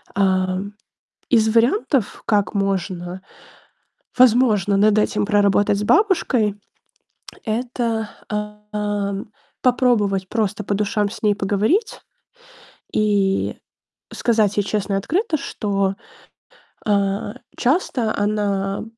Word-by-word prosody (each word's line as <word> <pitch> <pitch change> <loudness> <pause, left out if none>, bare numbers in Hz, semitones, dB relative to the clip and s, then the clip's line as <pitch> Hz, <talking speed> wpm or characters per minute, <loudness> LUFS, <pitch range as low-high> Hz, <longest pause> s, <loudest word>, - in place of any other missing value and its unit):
Ам, 190 +1 0 0.6
из 220 -3 +4
вариантов, 250 - +1
как 205 -1 +1
можно- 190 -2 -2 1.0
возможно 225 -6 +4
над 210 +1 +4
этим 210 0 +1
проработать 205 -1 +3
с - - -2
бабушкой- 255 - +2 0.9
это, 230 -1 -2 0.2
ам, 210 -1 -4 0.3
попробовать 215 -7 +2
просто 210 -2 -1
по 205 - -2
душам 205 0 0
с - - -10
ней 210 -1 +3
поговорить 215 - 0 0.9
и 200 -2 +1 0.6
сказать 215 -4 +1
ей 205 - +3
честно 200 0 -2
и - - +2
открыто, 330 - 0
что, 200 -8 -1 0.9
а, 200 0 0 0.2
часто 250 -5 0
она 200 -1 -1
210 Hz, 95 wpm, -21 LUFS, 200-225 Hz, 1.0 s, из